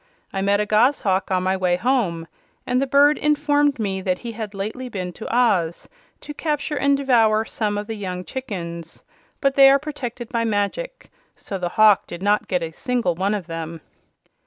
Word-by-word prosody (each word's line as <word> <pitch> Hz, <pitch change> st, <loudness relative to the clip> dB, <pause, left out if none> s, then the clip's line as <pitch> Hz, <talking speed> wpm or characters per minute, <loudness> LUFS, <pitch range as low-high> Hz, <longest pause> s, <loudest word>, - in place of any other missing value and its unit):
I 195 Hz, -, -2 dB
met 200 Hz, +1 st, +2 dB
a 210 Hz, -, +1 dB
goshawk 210 Hz, -3 st, +2 dB
on 185 Hz, -1 st, +1 dB
my 190 Hz, +1 st, +1 dB
way 180 Hz, -2 st, +1 dB
home, 185 Hz, -6 st, 0 dB, 0.4 s
and 250 Hz, +1 st, +1 dB
the 275 Hz, -, 0 dB
bird 285 Hz, +2 st, +4 dB
informed 290 Hz, -1 st, +2 dB
me 195 Hz, -4 st, -2 dB
that 185 Hz, -1 st, 0 dB
he 235 Hz, +3 st, -7 dB
had 215 Hz, -2 st, -7 dB
lately 220 Hz, +6 st, -5 dB
been 185 Hz, -5 st, -5 dB
to 195 Hz, -, -7 dB
Oz 195 Hz, -9 st, +1 dB, 0.3 s
to 295 Hz, -, -8 dB
capture 295 Hz, 0 st, -2 dB
and 280 Hz, 0 st, +2 dB
devour 225 Hz, -5 st, +3 dB
some 210 Hz, -2 st, -2 dB
of 205 Hz, -, -3 dB
the 225 Hz, -, -5 dB
young 185 Hz, -4 st, -5 dB
chickens. 170 Hz, -10 st, -7 dB, 0.4 s
But 275 Hz, -1 st, +2 dB
they 270 Hz, 0 st, +8 dB
are 275 Hz, -, +6 dB
protected 255 Hz, -5 st, -6 dB
by 230 Hz, -2 st, -1 dB
magic, 225 Hz, -, -3 dB, 0.2 s
so 195 Hz, -, -6 dB
the 175 Hz, -1 st, -2 dB
hawk 215 Hz, 0 st, +4 dB
did 175 Hz, +2 st, -8 dB
not 205 Hz, +1 st, +2 dB
get 180 Hz, -2 st, -1 dB
a 165 Hz, -, -4 dB
single 240 Hz, -, -1 dB
one 195 Hz, +5 st, 0 dB
of 195 Hz, -4 st, -5 dB
them." 165 Hz, 0 st, -6 dB
215 Hz, 190 wpm, -22 LUFS, 185-260 Hz, 0.4 s, they